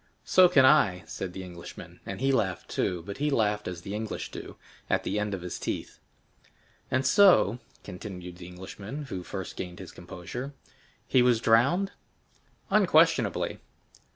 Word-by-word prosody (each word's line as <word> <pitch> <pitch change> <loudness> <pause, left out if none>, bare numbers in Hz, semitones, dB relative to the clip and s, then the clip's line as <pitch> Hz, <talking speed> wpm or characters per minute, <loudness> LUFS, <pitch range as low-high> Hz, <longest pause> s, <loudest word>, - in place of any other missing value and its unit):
"So 185 -1 +6
can 140 -7 +6
I," 110 -11 +4
said 95 - -5
the 95 - -6
Englishman, 90 -2 -10
and - - -5
he 135 0 +3
laughed 95 -9 -1
too; 90 -2 -1
but 100 0 -6
he 150 +1 +1
laughed 105 -6 +1
as 90 -1 -6
the 100 - -6
English 110 0 -4
do, - - -8 0.3
"at - - +1
the 105 - -1
end 105 -1 -1
of 90 - -8
his 90 - -5
teeth." - - -4 0.9
"And 130 +1 +1
so," 175 - +5 0.2
continued 90 -2 -8
the 90 -1 -10
Englishman 100 +9 -8
who 95 - -4
first 95 +1 -6
gained 90 -1 -6
his 95 - -9
composure, 90 +10 -7 0.5
"he 130 - +4
was 125 -2 +4
drowned?" 140 - +3 0.8
"Unquestionably." - - +3
105 Hz, 155 wpm, -28 LUFS, 90-130 Hz, 0.9 s, So